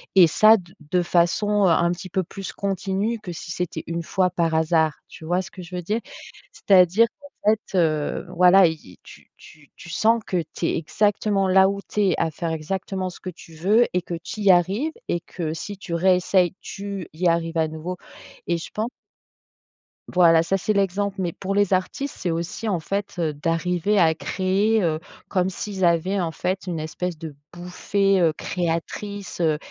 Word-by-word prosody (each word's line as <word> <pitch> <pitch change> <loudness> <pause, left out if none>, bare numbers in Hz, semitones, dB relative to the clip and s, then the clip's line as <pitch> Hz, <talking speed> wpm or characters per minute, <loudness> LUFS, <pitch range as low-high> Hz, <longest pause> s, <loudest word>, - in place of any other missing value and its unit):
et 185 -3 +8
ça, 215 +7 +6
d 175 -3 -12 0.2
de 180 - +3
façon 185 +4 +2
un 170 -1 +3
petit 185 +2 -6
peu 190 +2 0
plus 195 +2 -7
continue 200 +3 -2
que 190 -4 -7
si 170 +1 -7
c'était 180 0 -4
une 170 0 -3
fois 185 +2 +1
par 170 -2 0
hasard, 160 -1 +2
tu 160 - -12
vois 175 +3 +1
ce 185 - -9
que 185 - -10
je 175 +1 -9
veux 180 - -3
dire? 210 +7 -1 0.5
C'est-à-dire 190 +3 +4
qu'en 285 -7 -1
fait, 215 -2 -4
heu, 155 -4 0
voilà 180 +1 +7
y, 155 - -7
tu - - -16
tu 150 -2 -17
tu - - -12
sens 225 +7 +2
que 180 -3 0
tu - - -3
es - - 0
exactement 200 +3 +1
là 190 +1 +5
où 200 0 -3
tu 210 - 0
es, - - +1
à 165 - +1
faire 165 +2 -3
exactement 185 +4 -3
ce 175 - -12
que 185 - -6
tu 165 -2 -13
veux 205 +9 +3
et 180 - +1
que 175 - -7
tu 170 +5 -7
y 200 -2 +6
arrives 195 - +2 0.2
et 170 - -1
que 160 -3 -5
si 200 +5 -6
tu 185 -3 -7
réessayes, 180 0 +3
tu 200 -3 -6
y 175 +3 0
arrives 165 0 0
à 160 -1 +2
nouveau 160 +4 -5 0.5
et 170 - +1
je 165 - -7
pen 215 - -1 1.2
voilà, 165 -2 +5
ça 190 +4 0
c'est 215 +3 0
l'exemple, 200 0 0
mais 175 -2 -1
pour 195 +3 -4
les 205 -1 +3
artistes, 185 +9 -2
c'est 175 - -2
aussi, 170 +7 -4
en 190 -5 0
fait, 200 +6 -3
heu, 160 -3 0
d'arriver 175 +6 0
à 160 -2 +5
créer, 200 +5 +1
heu, 160 -2 0 0.3
comme 185 -1 +1
s'ils 190 0 -3
avaient, 175 +4 +2
en 170 -3 -1
fait, 185 +4 -3
une 170 -3 -3
espèce 165 +2 -4
de 155 -2 -8 0.2
bouffée, 190 +3 0
heu, 165 -3 +3
créatrice, 180 +5 -4
heu, 155 -2 +2
180 Hz, 195 wpm, -23 LUFS, 165-195 Hz, 1.2 s, et